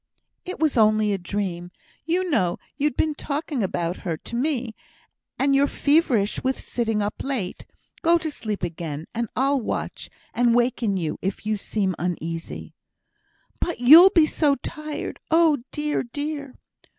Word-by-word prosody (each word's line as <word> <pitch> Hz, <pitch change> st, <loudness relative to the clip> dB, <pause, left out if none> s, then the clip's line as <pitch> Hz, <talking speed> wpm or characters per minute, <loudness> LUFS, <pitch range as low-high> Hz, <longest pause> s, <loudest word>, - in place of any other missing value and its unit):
"It 365 Hz, -, -5 dB
was 305 Hz, -6 st, +2 dB
only 215 Hz, -1 st, +4 dB
a 195 Hz, -, -2 dB
dream; 175 Hz, -2 st, -3 dB, 0.4 s
you 365 Hz, +3 st, +1 dB
know 180 Hz, -, +1 dB, 0.2 s
you'd 295 Hz, -3 st, 0 dB
been 310 Hz, -1 st, +1 dB
talking 290 Hz, -2 st, -3 dB
about 175 Hz, -2 st, -1 dB
her 170 Hz, -4 st, -3 dB
to 235 Hz, -, -8 dB
me, 250 Hz, -3 st, -1 dB, 0.6 s
and 275 Hz, +1 st, +2 dB
you're 280 Hz, +1 st, +4 dB
feverish 280 Hz, -10 st, +2 dB
with 260 Hz, 0 st, 0 dB
sitting 225 Hz, -3 st, -1 dB
up 205 Hz, -, -4 dB
late. 245 Hz, -10 st, -4 dB, 0.3 s
Go 335 Hz, +1 st, +4 dB
to 315 Hz, -2 st, -4 dB
sleep 215 Hz, -8 st, -5 dB
again, 160 Hz, -3 st, -4 dB
and 235 Hz, -1 st, -2 dB
I'll 275 Hz, +2 st, +2 dB
watch, -, -, -4 dB, 0.2 s
and 240 Hz, -1 st, +3 dB
waken 240 Hz, -4 st, +1 dB
you 160 Hz, -4 st, -3 dB
if 195 Hz, +2 st, -3 dB
you 215 Hz, 0 st, +1 dB
seem 200 Hz, -1 st, -1 dB
uneasy." 165 Hz, -1 st, -4 dB, 0.9 s
"But 345 Hz, -, -2 dB
you'll 315 Hz, +10 st, +10 dB
be 330 Hz, -5 st, +5 dB
so 295 Hz, -2 st, +2 dB
tired. 305 Hz, +3 st, -6 dB
Oh, 320 Hz, -3 st, +4 dB
dear! 300 Hz, 0 st, -1 dB
dear!" 285 Hz, +2 st, -5 dB
245 Hz, 150 wpm, -24 LUFS, 200-295 Hz, 0.9 s, you'll